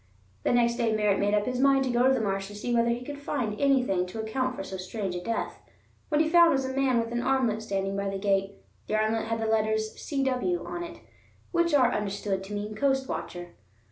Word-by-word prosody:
The - - +1
next 235 -1 +3
day 230 -3 +1
Merritt 210 -2 +2
made 205 +1 +2
up 205 0 +1
his 250 0 -2
mind 275 0 +4
to 260 - -1
go 240 +2 +3
to 265 - +5
the - - 0
marsh 195 -2 -1
to 205 - -10
see 240 +4 -3
whether 235 0 +3
he 240 +1 -2
could 285 +1 -6
find 245 -7 -3
anything 250 -10 +2
to 200 +5 -7
account 255 +4 -1
for 195 - -5
so 190 - -6
strange 190 +1 -4
a 175 - -4
death. 230 +5 -3 0.5
What 300 -2 +2
he 315 - +3
found 340 +1 +6
was 270 -4 +1
a 260 - -3
man 270 -2 +2
with 230 0 -2
an 240 0 -1
armlet 250 -4 +1
standing 195 -2 -2
by 200 0 -1
the 195 - -3
gate. 195 0 0 0.3
The 215 - 0
armlet 220 +1 +1
had 225 0 -1
the 225 - -1
letters 220 0 +1
"C.W." 275 +5 -1
on 345 - -5
it, 335 0 -9 0.5
which 340 -3 +2
are 250 -3 +4
understood 200 -1 -2
to 205 - -8
mean 210 +1 -4
Coast 265 +3 +1
Watcher. 175 0 -5
230 Hz, 235 wpm, -27 LUFS, 205-265 Hz, 0.5 s, found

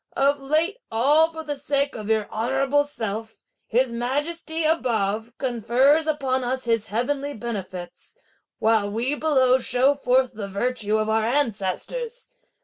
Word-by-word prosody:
Of 280 +1 +2
late 315 - +1
all 290 +8 +4
for 320 -1 -8
the 295 -2 -4
sake 280 0 0
of 215 -1 -6
your 220 -2 +1
honourable 270 +5 +1
self, 220 -5 -4 0.3
His 245 +1 +1
Majesty, 315 +7 -1
above, 225 -8 0
confers 260 +5 +2
upon 270 -4 0
us 255 +1 0
his 230 -2 0
heavenly 275 +6 -2
benefits; 185 -6 -7 0.4
while 220 -2 +2
we, 235 +7 -1
below, 260 -4 +3
show 255 +3 +3
forth 260 -2 +1
the 210 -2 -5
virtue 215 +1 -1
of 215 0 0
our 220 0 +1
ancestors! 290 - -2
255 Hz, 140 wpm, -24 LUFS, 220-290 Hz, 0.4 s, all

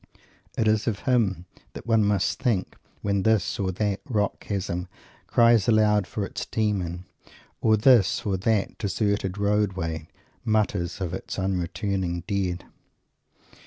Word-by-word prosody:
It 110 - +2
is 110 0 +2
of 105 -3 -1
him 110 - +1 0.3
that - - -9
one 115 -2 +3
must 100 -2 0
think, 115 -8 0 0.3
when 100 -1 +1
this 110 -1 +1
or 95 -2 0
that 100 +1 -1
rock 105 -4 0
chasm 95 -3 -3 0.4
cries 115 -4 +4
aloud 105 -3 +3
for 100 +1 -3
its - - -6
Demon, 95 -5 -1 0.6
or 110 -1 +4
this 110 -4 +4
or 100 -2 +1
that 105 +2 0
deserted 100 -1 -1
roadway 95 -6 -1 0.4
mutters 105 -6 0
of 90 -2 -2
its 95 - -5
unreturning 95 -1 -2
dead. 95 -4 -2
100 Hz, 130 wpm, -25 LUFS, 95-110 Hz, 0.6 s, cries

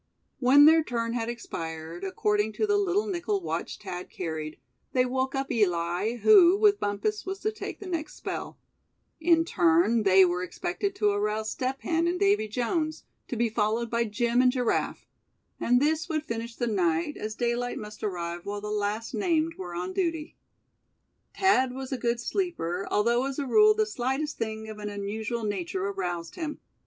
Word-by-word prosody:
When 280 +3 +7
their 320 +1 +7
turn 230 -3 -2
had 235 -1 -2
expired, 165 -6 -6
according 210 +2 0
to 430 - 0
the 415 -1 +2
little 405 0 +1
nickel 390 +1 -1
watch 370 - -4
Thad 180 0 -7
carried, 160 -3 -5 0.4
they 255 -1 +3
woke 260 +2 -1
up 270 0 -2
Eli, 180 +1 +1
who, 375 - +6
with 415 -1 +4
Bumpus 205 - -1
was 385 +1 -4
to 430 - 0
take 435 - -7
the 410 - -9
next 335 -4 -4
spell; - - -5 0.6
in 330 0 +4
turn 330 -9 +3
they 190 -2 +6
were 180 0 -1
expected 360 - -3
to 210 - +2
arouse 210 +1 -1
Step 260 +1 -3
Hen 335 0 +1
and 355 +1 -1
Davy 400 - +3
Jones, 310 - -2 0.2
to - - -4
be 235 +1 +2
followed 225 +1 0
by 235 0 +1
Jim 235 +3 +1
and 250 0 +5
Giraffe; 250 -2 -1 0.5
and 245 +1 +3
this 310 +3 +1
would 310 -2 -1
finish 230 -2 -5
the 240 - -1
night, 180 - 0
as 215 0 -5
daylight 240 +1 -1
must 210 0 -9
arrive 175 -3 -3
while 205 0 -4
the 210 +1 -5
last 210 +3 -2
named 320 +7 +1
were 175 -2 -7
on 180 +2 -3
duty. 330 -3 -2 1.0
Thad 265 -10 +3
was 265 0 -6
a 265 - -1
good 235 0 0
sleeper, 235 - -2
although 235 +4 +2
as 275 - -5
a 285 - -1
rule 425 - +5
the 435 0 +2
slightest 295 - -2
thing 220 -1 -3
of 215 -1 -8
an 210 0 -4
unusual 215 +3 -4
nature 190 -2 -2
aroused 180 -4 -3
him. 315 -3 -4
235 Hz, 180 wpm, -27 LUFS, 205-320 Hz, 1.0 s, When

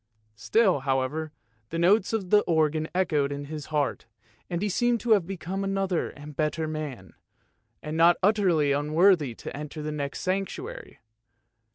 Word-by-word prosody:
Still, 175 - +2
however, 135 +4 -1 0.4
the 165 - -4
notes 190 +4 +3
of 205 -5 -2
the 210 - +7
organ 155 -1 +1
echoed 150 -6 +1
in 145 0 -5
his 150 0 -7
heart, 150 -3 -1 0.4
and 170 - -2
he - - +1
seemed 240 +4 +1
to 240 - -2
have 200 -6 +4
become 190 +1 -4
another 195 -2 -1
and 145 +1 -11
a - - -14
better 155 +2 -1
man, 145 - -6 0.7
and 150 +1 -4
not 170 +1 +6
utterly 185 -8 +3
unworthy 150 -1 +3
to - - -8
enter 150 +1 -6
the 155 - -3
next 145 -2 -4
sanctuary. 370 - -4
160 Hz, 160 wpm, -26 LUFS, 145-195 Hz, 0.7 s, the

